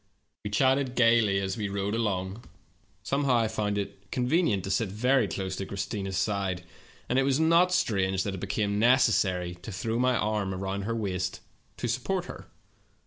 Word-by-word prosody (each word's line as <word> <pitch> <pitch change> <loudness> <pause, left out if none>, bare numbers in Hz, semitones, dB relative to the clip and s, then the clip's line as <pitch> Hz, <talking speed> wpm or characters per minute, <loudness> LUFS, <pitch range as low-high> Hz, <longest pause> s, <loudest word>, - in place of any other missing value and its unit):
"We 105 - -3
chatted 130 +4 +2
gaily 115 -4 +4
as 95 -1 -2
we 105 -2 -2
rode 100 +1 -2
along. 100 -1 -2 0.6
Somehow 140 +2 +1
I 115 -2 +2
found 105 -2 -2
it 100 0 -6
convenient 125 - +1
to 95 - -3
sit 110 0 +1
very 125 +4 +2
close 95 -1 -3
to 95 - -3
Chris 100 +1 -3
tina's 95 -3 -4
side, 100 -3 -1 0.4
and 125 - +2
it - - +3
was 135 +1 +2
not 165 +3 +4
strange 95 - +1
that 100 - -3
it 95 - -5
became 100 +1 -1
necessary 105 -7 +3
to 110 - -7
throw 110 +4 -2
my 125 -1 +3
arm 105 -3 -1
around 95 +1 -3
her 115 +1 -1
waist 95 -4 -3 0.4
to 120 - -2
support 150 +11 -1
her. - - -10
105 Hz, 180 wpm, -28 LUFS, 95-125 Hz, 0.6 s, gaily